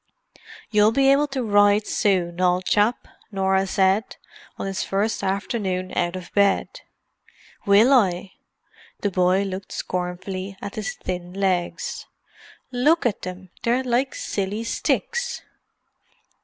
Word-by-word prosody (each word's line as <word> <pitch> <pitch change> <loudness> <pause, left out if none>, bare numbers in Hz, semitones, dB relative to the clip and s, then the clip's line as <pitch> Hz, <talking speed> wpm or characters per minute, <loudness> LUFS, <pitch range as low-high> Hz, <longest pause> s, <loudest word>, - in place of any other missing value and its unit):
"You'll 210 0 +5
be 270 +2 +4
able 290 +2 +3
to 270 -2 -3
ride 205 -1 +4
soon, 180 -3 0
old 180 0 +2
chap," 210 +3 +1 0.2
Norah 190 -1 +1
said, 190 +3 +1 0.4
on - - -4
his 195 -1 -2
first 205 +3 -1
afternoon 190 -2 -2
out 175 0 0
of 185 -1 -8
bed. 200 - +1 0.9
"Will 215 +7 +6
I?" 190 -6 +2 0.7
The 205 - 0
boy 185 +1 +2
looked 190 -1 -6
scornfully 185 +2 -4
at 200 - -7
his 220 +9 -4
thin 180 -1 -5
legs. 185 -3 -2 0.6
"Look 290 +6 +2
at 225 -5 0
them—they're 190 +7 -3
like 255 +2 0
silly 200 +3 -3
sticks!" 480 - -1
200 Hz, 120 wpm, -23 LUFS, 185-225 Hz, 0.9 s, Will